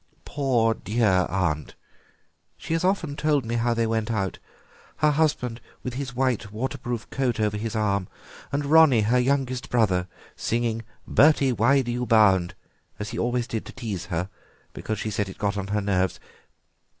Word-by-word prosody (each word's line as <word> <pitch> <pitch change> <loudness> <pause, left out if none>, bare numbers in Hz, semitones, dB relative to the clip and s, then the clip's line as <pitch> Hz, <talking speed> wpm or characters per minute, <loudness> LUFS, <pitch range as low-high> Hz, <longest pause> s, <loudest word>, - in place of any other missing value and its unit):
Poor 125 -6 +1
dear 105 -5 +1
aunt, 85 -6 -1 0.8
she - - -4
has 165 - 0
often 180 -6 0
told 150 -4 +1
me 115 - -3
how 120 0 +1
they 115 0 +1
went 110 0 -1
out, 100 -4 -2 0.6
her 150 0 +3
husband 140 -6 0 0.2
with 125 - -4
his 130 -1 -5
white 125 -5 0
waterproof 120 0 -4
coat 125 -4 -1
over 105 -1 +1
his 115 +2 -4
arm, 100 -3 0 0.4
and 140 +1 -1
Ronnie, 150 -5 +6
her 115 +4 +2
youngest 130 -1 0
brother, 95 -7 +2 0.3
singing 115 -1 -1 0.2
'Bertie, 140 -3 +4
why 130 +5 +3
do 120 - -3
you 125 0 -2
bound?' 100 -5 +4 0.4
as 105 +1 -5
he 115 - -5
always 120 0 0
did 115 -3 -4
to - - -9
tease 105 -10 -5
her, 90 0 -2 0.5
because 110 - -4
she 110 +1 -3
said 105 -2 -1
it 95 - -10
got 100 -1 -1
on 100 -1 -3
her 105 +1 0
nerves. 95 -2 0
115 Hz, 170 wpm, -25 LUFS, 105-130 Hz, 0.8 s, Ronnie